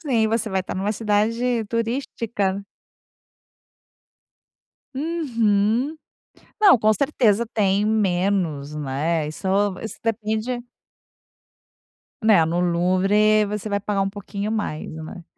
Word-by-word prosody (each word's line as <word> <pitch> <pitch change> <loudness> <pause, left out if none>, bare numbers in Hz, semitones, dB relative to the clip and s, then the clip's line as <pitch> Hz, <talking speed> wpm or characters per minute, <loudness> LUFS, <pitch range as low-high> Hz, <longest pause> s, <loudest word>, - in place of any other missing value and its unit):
Sim, 250 -9 +1
você 225 0 0
vai 190 -1 0
estar 185 - -6
numa 200 +3 -1
cidade 225 +3 0
turística. 230 -4 -2 2.3
Uhum. 255 -4 0 0.6
Não, 390 - +7
com 215 0 +4
certeza 235 -4 +2
tem 200 -1 +2
menos, 180 -8 0
né, 150 +3 -1
isso 155 +5 -5 0.3
isso 220 - -6
depende 225 +2 -2 1.6
Né, 215 -7 +5
no 170 +2 0
Louvre 190 +5 +3
você 210 +1 -4
vai 200 -1 -1
pagar 200 -1 -1
um 195 - -1
pouquinho 205 +1 -5
mais, 205 -8 -3
né. 160 +3 -8
210 Hz, 105 wpm, -22 LUFS, 190-230 Hz, 2.3 s, Não